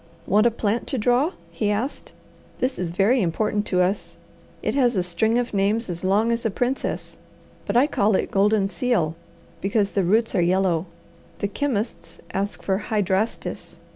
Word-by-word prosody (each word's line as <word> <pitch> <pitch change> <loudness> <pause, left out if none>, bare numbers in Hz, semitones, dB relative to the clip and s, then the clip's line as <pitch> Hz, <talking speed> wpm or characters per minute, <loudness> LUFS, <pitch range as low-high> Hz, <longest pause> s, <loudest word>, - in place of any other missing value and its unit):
"Want 210 +4 +4
a - - +5
plant 225 0 -1
to 270 - -1
draw?" 250 - +2 0.2
he 210 - -1
asked. 220 +7 -3 0.5
"This 255 +1 -1
is 180 -2 -1
very 205 +9 +3
important 205 +4 0
to 180 -1 +2
us. 195 +3 -2 0.5
It - - 0
has 250 -4 +3
a 185 - +1
string 200 +7 +1
of 245 -1 -1
names 200 +1 +1
as 170 0 -6
long 205 +5 +2
as 235 0 -1
a 225 - +1
princess, 245 +6 -2 0.5
but 205 +3 +1
I 255 - +6
call 215 -8 +2
it - - -1
goldenseal, 200 -2 +2 0.5
because 200 +1 +1
the 200 - +1
roots 220 +6 +2
are 185 - +2
yellow. 180 -1 +2 0.5
The 200 - -1
chemists 215 -8 -3 0.2
ask 200 +2 -2
for 190 0 0
hydrastis. 205 +1 -1
210 Hz, 170 wpm, -23 LUFS, 190-235 Hz, 0.5 s, I